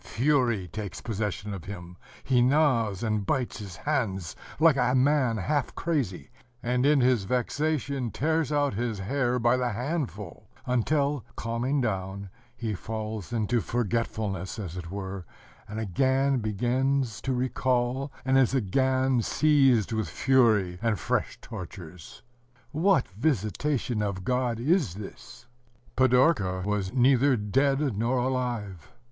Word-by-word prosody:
Fury 120 Hz, -7 st, +1 dB
takes 105 Hz, +2 st, -6 dB
possession 105 Hz, -1 st, -3 dB
of 95 Hz, -5 st, -7 dB
him: 90 Hz, -3 st, -8 dB, 0.3 s
he 125 Hz, -2 st, +3 dB
gnaws 120 Hz, -, +2 dB
and 110 Hz, -2 st, 0 dB
bites 120 Hz, +5 st, -1 dB
his 100 Hz, -4 st, -8 dB
hands 100 Hz, -, -2 dB, 0.2 s
like 160 Hz, -2 st, +6 dB
a 125 Hz, -1 st, +2 dB
man 130 Hz, -3 st, +3 dB
half 140 Hz, +7 st, -1 dB
crazy, 135 Hz, -, -2 dB, 0.3 s
and 125 Hz, +2 st, +1 dB
in 145 Hz, -2 st, +4 dB
his 125 Hz, -5 st, +3 dB
vexation 140 Hz, +2 st, -1 dB
tears 160 Hz, +4 st, 0 dB
out 145 Hz, -3 st, +1 dB
his 115 Hz, +1 st, -2 dB
hair 125 Hz, +5 st, 0 dB
by 120 Hz, +1 st, +3 dB
the 125 Hz, -1 st, 0 dB
handful, 120 Hz, -, -4 dB, 0.2 s
until, 140 Hz, +2 st, +1 dB
calming 120 Hz, +5 st, -1 dB
down, 95 Hz, -3 st, -3 dB, 0.3 s
he 115 Hz, -3 st, -3 dB
falls 110 Hz, 0 st, -5 dB
into 115 Hz, 0 st, 0 dB
forgetfulness, 110 Hz, -5 st, -2 dB
as 95 Hz, -6 st, -6 dB
it 85 Hz, -2 st, -6 dB
were, 95 Hz, 0 st, -5 dB, 0.4 s
and 105 Hz, +2 st, -5 dB
again 130 Hz, +6 st, +1 dB
begins 125 Hz, +3 st, 0 dB
to 135 Hz, -, -2 dB
recall, 130 Hz, +1 st, 0 dB
and 135 Hz, 0 st, +4 dB
is 130 Hz, 0 st, +3 dB
again 130 Hz, +3 st, +2 dB
seized 135 Hz, -6 st, +3 dB
with 110 Hz, -6 st, -1 dB
fury 110 Hz, -, +2 dB
and 115 Hz, -3 st, +1 dB
fresh -, -, -1 dB
tortures.... 90 Hz, -5 st, -10 dB, 0.5 s
What 175 Hz, -2 st, +2 dB
visitation 115 Hz, -, -1 dB
of 100 Hz, -3 st, -2 dB
God 125 Hz, 0 st, 0 dB
is 140 Hz, -, +1 dB
this? 100 Hz, -1 st, -10 dB, 0.5 s
Pidorka 125 Hz, -, +3 dB
was 105 Hz, -2 st, -1 dB
neither 130 Hz, +1 st, +4 dB
dead 135 Hz, +5 st, +1 dB
nor 115 Hz, +5 st, 0 dB
alive. 120 Hz, -, -2 dB
120 Hz, 130 wpm, -27 LUFS, 105-135 Hz, 0.5 s, like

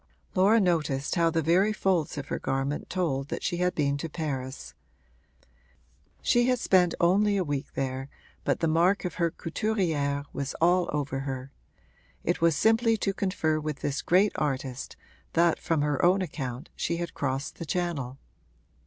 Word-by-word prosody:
Laura 200 Hz, +5 st, +5 dB
noticed 155 Hz, -7 st, +1 dB
how 170 Hz, -2 st, +3 dB
the 165 Hz, -1 st, 0 dB
very 185 Hz, +7 st, +3 dB
folds 180 Hz, -7 st, 0 dB
of 145 Hz, 0 st, -5 dB
her -, -, -2 dB
garment 135 Hz, +2 st, -2 dB
told 150 Hz, -7 st, -1 dB
that -, -, -5 dB
she 175 Hz, -, -1 dB
had 180 Hz, 0 st, +1 dB
been 140 Hz, -2 st, +1 dB
to 165 Hz, +3 st, -5 dB
Paris; 130 Hz, -, -5 dB, 1.5 s
she 240 Hz, 0 st, +3 dB
had 250 Hz, 0 st, +3 dB
spent 180 Hz, -6 st, +3 dB
only 200 Hz, +4 st, +3 dB
a 190 Hz, -, +1 dB
week 145 Hz, -3 st, -4 dB
there 135 Hz, 0 st, -3 dB, 0.3 s
but -, -, 0 dB
the 165 Hz, -, +2 dB
mark 175 Hz, +5 st, +3 dB
of 180 Hz, -, -2 dB
her 170 Hz, -, +3 dB
couturière 160 Hz, -6 st, -1 dB
was 140 Hz, 0 st, -3 dB
all 175 Hz, +1 st, +3 dB
over 140 Hz, -2 st, -2 dB
her: 135 Hz, -1 st, -5 dB, 0.7 s
it -, -, 0 dB
was 165 Hz, -2 st, +4 dB
simply 225 Hz, -, +3 dB
to 195 Hz, -1 st, -1 dB
confer 180 Hz, -6 st, 0 dB
with 150 Hz, -2 st, -4 dB
this 145 Hz, 0 st, -1 dB
great 190 Hz, +4 st, +4 dB
artist 135 Hz, -3 st, -3 dB, 0.4 s
that, 170 Hz, 0 st, +3 dB
from 160 Hz, -4 st, 0 dB
her 150 Hz, -2 st, 0 dB
own 185 Hz, +2 st, +4 dB
account, 135 Hz, -4 st, -5 dB
she 170 Hz, -, -1 dB
had 170 Hz, -1 st, -4 dB
crossed 135 Hz, 0 st, -3 dB
the 165 Hz, -, -4 dB
Channel. 150 Hz, -7 st, -2 dB
165 Hz, 165 wpm, -28 LUFS, 140-180 Hz, 1.5 s, Laura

